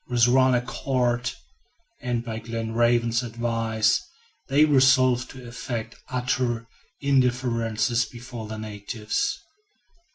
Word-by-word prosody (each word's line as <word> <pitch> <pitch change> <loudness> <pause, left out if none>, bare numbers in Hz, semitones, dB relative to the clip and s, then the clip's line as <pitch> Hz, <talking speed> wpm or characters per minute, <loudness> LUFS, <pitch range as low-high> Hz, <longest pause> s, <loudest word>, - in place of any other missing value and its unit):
With 120 -1 +3
one 130 0 +4
accord, 125 -1 0 0.7
and 120 -1 -2
by 110 -1 -4
Glenarvan's 115 +1 +1
advice, 115 -2 0 0.5
they 145 +3 +5
resolved 130 -3 +4
to 130 -2 -10
affect 120 -1 -5
utter 125 -2 -1 0.4
indifference 120 -4 +1
before 120 0 -8
the 110 0 -6
natives. 105 0 -3
120 Hz, 95 wpm, -25 LUFS, 115-125 Hz, 0.7 s, they